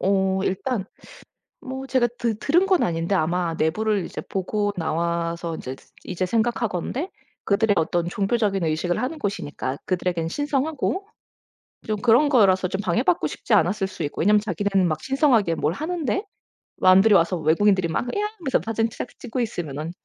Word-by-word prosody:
어 190 0 +1
일단 195 +2 -1 0.8
뭐 265 0 -6
제가 250 -2 +2
드 230 -3 -1
들은 350 +7 +3
건 380 -2 +3
아닌데 170 +3 0
아마 170 0 0
내부를 200 +4 0
이제 - - -6
보고 205 +2 -2
나와서 170 0 -2
인제 130 -3 -6
스 - - -23
이제 185 0 -2
생각하건대 230 - -1 0.4
그들의 205 +1 +3
어떤 170 +1 +1
종교적인 200 -1 0
의식을 175 +6 -1
하는 290 +5 -3
곳이니까 145 - -3
그들에게는 175 -3 -1
신성하고 295 - -1 0.8
좀 215 -1 0
그런 245 +5 +5
거라서 195 -8 +4
좀 190 +2 -3
방해받고 175 -4 +1
싶지 - - -3
않았을 190 +4 +3
수 190 - -6
있고 145 - -3
왜냐하면 210 +4 +5
자기는 195 -1 0
막 155 - -2
신성하게 255 - +2
뭘 155 +1 0
하는데 335 - -2 0.5
남들이 195 +3 +6
와서 170 +1 +3
외국인들이 175 +4 +3
막 165 - -2
"이야." 415 - 0
하면서 275 -6 +1
사진 225 0 0
짝 230 - -6
찍고 250 +1 -5
있으면은 160 - -4
195 Hz, 365 characters per minute, -23 LUFS, 170-240 Hz, 0.8 s, 남들이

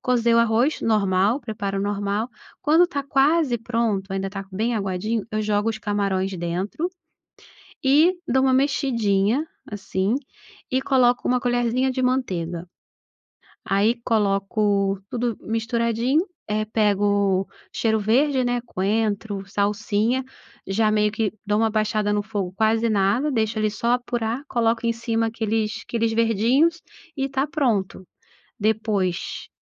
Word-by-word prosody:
cozer 235 -2 +2
o - - +5
arroz, 235 +6 +2
normal, 205 +1 +2
preparo 205 -6 -4
normal, 205 +3 -1 0.3
quando 320 +4 +5
tá 290 -5 -3
quase 275 -1 +2
pronto, 225 -4 -1
ainda 195 0 -2
tá 195 -1 -5
bem 220 +5 -1
aguadinho, 205 +2 -1
eu 215 0 -1
jogo 210 +1 +1
os 220 -1 -2
camarões 195 -2 -1
dentro 180 - -2 1.0
e 300 +7 +5
dou 265 0 +2
uma 260 -1 +3
mexidinha, 245 -4 +1 0.3
assim, 195 0 -1 0.6
e 260 +1 +1
coloco 250 -2 +3
uma 250 0 +2
colherzinha 245 +1 +1
de 260 0 -2
manteiga. 180 -10 -1 1.0
Aí 205 +4 +3
coloco 200 -2 +1
tudo 240 -2 -1
misturadinho, 230 +5 0 0.3
eh, 215 +1 -1
pego 205 -3 +1 0.3
cheiro 220 -1 +1
verde, 260 +6 +2
né, 245 0 0
coentro, 205 -1 -1
salsinha, 210 +5 0 0.4
já 215 +3 +2
meio 210 0 +2
que 220 -1 -1
dou 210 0 +1
uma 225 0 +2
baixada 215 -1 0
no 205 - +1
fogo, 205 -4 -4
quase 220 +2 +2
nada, 215 +8 +2
deixo 220 -2 0
ali 215 -1 +1
só 235 +4 0
apurar, 245 0 -2
coloco 230 -1 0
em 230 - +2
cima 230 0 -1
aqueles 220 -1 -2
aqueles 230 -1 0
verdinhos 230 - +2 0.4
e 270 0 0
tá 270 +1 0
pronto. 235 - -1 0.6
Depois 210 -4 -1
220 Hz, 130 wpm, -23 LUFS, 205-245 Hz, 1.0 s, o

